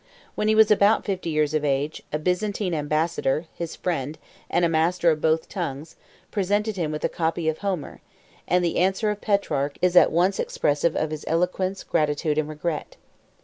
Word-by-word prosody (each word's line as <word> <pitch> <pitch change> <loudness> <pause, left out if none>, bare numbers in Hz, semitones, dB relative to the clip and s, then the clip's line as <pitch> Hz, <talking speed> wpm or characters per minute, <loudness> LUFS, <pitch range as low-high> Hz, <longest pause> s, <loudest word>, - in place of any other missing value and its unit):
When 210 - -1
he 215 - +4
was 220 -1 +6
about 210 +1 +4
fifty 185 -4 -2
years 155 -1 +1
of 155 -1 0
age, 145 +2 -1
a 150 - 0
Byzantine 180 +3 -1
ambassador, 155 0 0
his 170 -1 -5
friend, 155 -4 -3 0.3
and 175 - +2
a - - +4
master 165 +1 +2
of 155 -1 -2
both 160 0 +1
tongues, 155 -4 -5 0.4
presented 205 +2 0
him 165 -5 -2
with 150 - -5
a - - +4
copy 165 0 -2
of 160 0 0
Homer; 190 -7 -4 0.5
and 180 0 +2
the 170 - -1
answer 190 +4 +2
of 210 - -6
Petrarch 150 -9 0
is 180 0 +2
at - - +7
one 180 +4 +3
expressive 150 +3 0
of 155 0 -1
his 155 -1 -5
eloquence, 185 +3 0
gratitude, 150 0 0
and 155 0 -2
regret. 155 +1 -4
165 Hz, 185 wpm, -24 LUFS, 155-185 Hz, 0.5 s, at